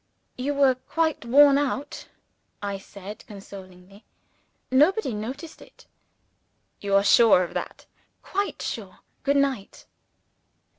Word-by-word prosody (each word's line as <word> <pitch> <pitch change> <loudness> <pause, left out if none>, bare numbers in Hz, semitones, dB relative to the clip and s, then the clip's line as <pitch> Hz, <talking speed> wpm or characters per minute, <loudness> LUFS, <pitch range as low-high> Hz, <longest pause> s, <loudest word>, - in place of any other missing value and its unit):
"You 280 +3 -2
were 275 -2 +4
quite 315 +3 -2
worn 280 +3 +6
out," 285 0 -3 0.5
I 200 -1 -4
said, 200 +1 -11
consolingly. 195 -1 -13 0.7
"Nobody 300 - +3
noticed 260 +10 -7
it." - - -17 0.9
"You 200 -1 0
are 200 - +5
sure 205 -2 +6
of 175 - -7
that?" - - -6 0.4
"Quite 400 +1 -3
sure. - - -6 0.2
Good 280 0 +1
night." 270 -8 -2
250 Hz, 110 wpm, -25 LUFS, 200-285 Hz, 0.9 s, worn